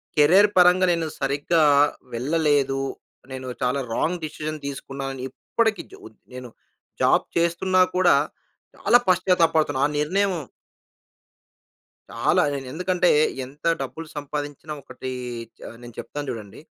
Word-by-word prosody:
Career 180 +8 +6
పరంగా 180 +1 +6
నేను 165 -1 -1
సరిగ్గా 145 +4 +1 0.5
వెళ్ళలేదు. 140 +1 +1 0.5
నేను 130 0 -6
చాలా 125 +2 +1 0.2
రాంగ్ 175 +1 -1
డిసిషన్ 155 0 -5
తీసుకున్నానని 135 -1 -5
ఇప్పటికి 220 - -1
జ్ - - -11
ఉ - - -7 0.3
నేను 125 -1 -8 0.5
జాబ్ - - +3
చేస్తున్నా 170 +2 +2
కూడా, 180 -1 +5 0.6
చాలా 240 - +4
పశ్చాత్తాప 180 -2 +3
పడుతున్నా 145 -4 +1
ఆ - - -6
నిర్ణయం 190 +6 +1 1.8
చాలా. - - +2
నేను 135 -2 -5
ఎందుకంటే, 180 +2 +1 0.4
ఎంత 140 +5 -11 0.2
డబ్బులు 165 0 -7
సంపాదించిన 145 +1 -5
ఒకటీ 130 0 -7 0.5
చ - - -27 0.2
నేను 120 -1 -11
చెప్తాను 145 -1 -6
చూడండి. 105 -2 -8
150 Hz, 120 wpm, -23 LUFS, 135-180 Hz, 1.8 s, Career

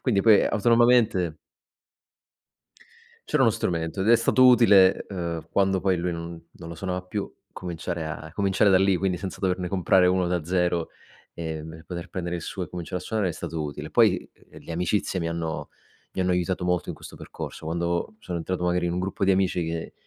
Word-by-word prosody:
Quindi 110 -7 +1
poi 110 -2 +6
autonomamente 115 -6 +3 1.9
C'era - - +2
uno - - +5
strumento 85 +1 -2
ed 100 - +1
è 120 - +8
stato 125 +2 +4
utile, 105 -7 +6
ehm, 85 -4 -4
quando 95 -1 +2
poi 95 0 +1
lui 90 +1 -1
non 85 0 -6
non 85 - -10
lo 85 - -7
suonava 90 +1 -3
più 100 +2 -5 0.2
cominciare 85 -2 -5
a 80 0 -6
cominciare 100 +1 +2
da 95 - +6
lì, 95 0 +3
quindi 90 0 0
senza 95 +1 -6
doverne 90 -1 -1
comprare 95 -1 +3
uno 90 -1 +2
da 90 -2 -1
zero, 90 -1 0 0.5
ehm, 80 -1 -5
e 80 0 -12
poter 90 0 -7
prendere 85 0 -4
il 85 - -7
suo 95 +1 -5
e 85 - -9
cominciare 90 +1 -5
a - - -11
suonare 110 -4 0
è - - -1
stato 80 0 -5
utile. 75 -1 -6
Poi, - - +3 0.2
uhm, - - -12
le - - -8
amicizie 90 +2 -1
mi 85 - -2
hanno 80 -3 -4 0.4
mi - - -5
hanno 90 0 +1
aiutato 90 0 -1
molto 90 -1 0
in - - -4
questo - - -11
percorso. - - -8
Quando 85 +4 -2
sono 90 -4 -5
entrato 90 +2 -3
magari 90 0 +1
in 85 - 0
un 90 - -1
gruppo 95 +1 -3
di 95 - +4
amici 95 -2 +1
che 80 0 -4
90 Hz, 200 wpm, -25 LUFS, 85-95 Hz, 1.9 s, è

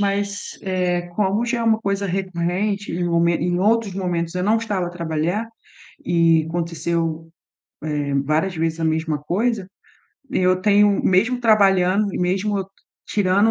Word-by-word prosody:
Mas, 200 0 -2
eh, 180 -2 0
como 205 +3 +1
já 240 0 -1
é - - -1
uma 220 -1 +3
coisa 200 -1 -2
recorrente, 190 +2 -2
em 175 +1 -2
momen 170 0 +2
em 175 +1 0
outros 215 -1 +2
momentos 175 -3 -2
eu 180 - -1
não 215 +3 +3
estava 205 -6 -2
a - - -5
trabalhar 170 +5 -2 0.6
e 165 -2 +3
aconteceu, 165 -1 -2 0.6
eh, 145 -1 -2
várias 160 +5 0
vezes 165 0 -1
a - - 0
mesma 160 -1 0
coisa. 195 +5 -1 0.6
Eu 185 0 +2
tenho, 205 0 +4
mesmo 225 +7 +2
trabalhando 200 -3 +3
e - - -3
mesmo 195 +2 0 0.4
tirando 200 +2 +2
185 Hz, 145 wpm, -21 LUFS, 170-205 Hz, 0.6 s, tenho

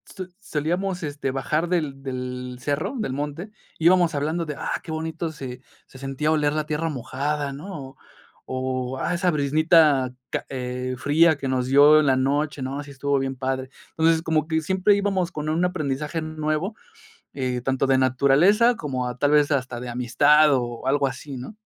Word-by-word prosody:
so 185 - -5
solíamos, 180 +1 -2
este, 145 -2 -3
bajar 150 +5 -1
del 150 -6 -1
del 125 -1 -5
cerro, 150 - -2
del 215 - -2
monte, 150 +8 -5 0.3
íbamos 170 0 +4
hablando 155 +4 -1
de: 150 - -4
"Ah, - - -3
qué 165 - -8
bonito 160 +1 -3
se 130 -4 -8 0.3
se 130 - -14
sentía 135 +3 -1
oler 150 -2 +2
la 155 0 -1
tierra 155 +1 -2
mojada", 140 +2 -3
¿no?, 140 -3 -8 0.5
o: 130 0 -3
"Ah, - - -1
esa 180 +1 +1
briznita 150 -2 +3 0.2
ca - - -2
eh 125 0 -4
fría 155 +3 +4
que 135 - -4
nos 130 -1 0
dio 145 +3 +7
en 150 - +2
la 130 - +4
noche, 145 +2 0
¿no?, 135 +2 -4
sí 145 - -13
estuvo 140 +1 0
bien 135 0 -2
padre", 130 0 -3 0.3
entonces 160 0 +3
como 155 -1 0
que 160 -1 0
siempre 190 +4 +2
íbamos 195 -3 0
con 150 -3 -5
un 165 +3 +1
aprendizaje 155 -2 -2
nuevo, 155 +5 -2 0.6
eh, 125 -2 -2
tanto 135 +1 0
de 130 -1 +3
naturaleza 145 - +4
como 130 -7 -3
a 125 - -7
tal 145 +3 +2
vez 150 0 +4
hasta 130 -3 -1
de 125 0 -6
amistad 145 +5 +4
o 120 -1 -3
algo 140 +1 +2
así, 135 +1 -6
¿no? 125 - -8
145 Hz, 180 wpm, -24 LUFS, 130-160 Hz, 0.6 s, dio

